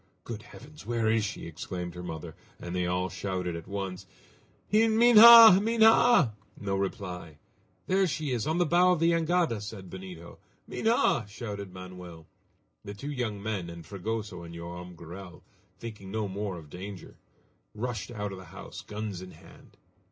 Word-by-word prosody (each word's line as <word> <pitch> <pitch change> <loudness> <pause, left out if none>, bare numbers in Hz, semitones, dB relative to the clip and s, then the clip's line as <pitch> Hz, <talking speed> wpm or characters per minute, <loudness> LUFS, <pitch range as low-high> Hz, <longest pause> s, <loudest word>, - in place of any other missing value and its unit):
"Good 115 -3 -6
heavens! 150 +6 -14
where 115 0 0
is 110 -1 +2
she?" 105 0 -5
exclaimed 90 +2 -6
her 90 - -8
mother, 80 -2 -7 0.3
and 85 +1 -6
they 90 -1 0
all 90 +1 0
shouted 90 -3 -3
at 85 - -8
once: 95 -2 -5 0.7
"Himha! 225 -1 +9
Minha!" 225 - +5 0.3
No 100 -1 -2
reply. 90 -5 -4 0.5
"There 190 0 +2
she 150 -2 -3
is, 120 0 -1
on 160 +2 0
the 175 - +3
bow 180 +3 +4
of 175 - -1
the 165 +1 +3
jangada!" 165 - +1
said 100 -3 -8
Benito. 90 -3 -10 0.3
"Minha!" 220 - +1
shouted 100 -3 -7
Manoel. 90 -3 -10 0.6
The 100 - -8
two 140 +8 -6
young 110 -7 -3
men, 105 -5 -3
and 85 -1 -10
Fragoso 105 -1 -5
and 85 0 -10
Joam 85 +1 -8
Garral, 85 +2 -11 0.3
thinking 105 -4 -9
no 105 +1 -2
more 100 -1 -4
of 75 -3 -12
danger, 95 +1 -9 0.6
rushed 115 -1 -4
out 105 -4 -4
of 95 - -8
the 95 - -11
house, 95 +4 -10
guns 105 -3 -6
in 95 - -9
hand. - - -18
100 Hz, 160 wpm, -28 LUFS, 90-125 Hz, 0.7 s, Himha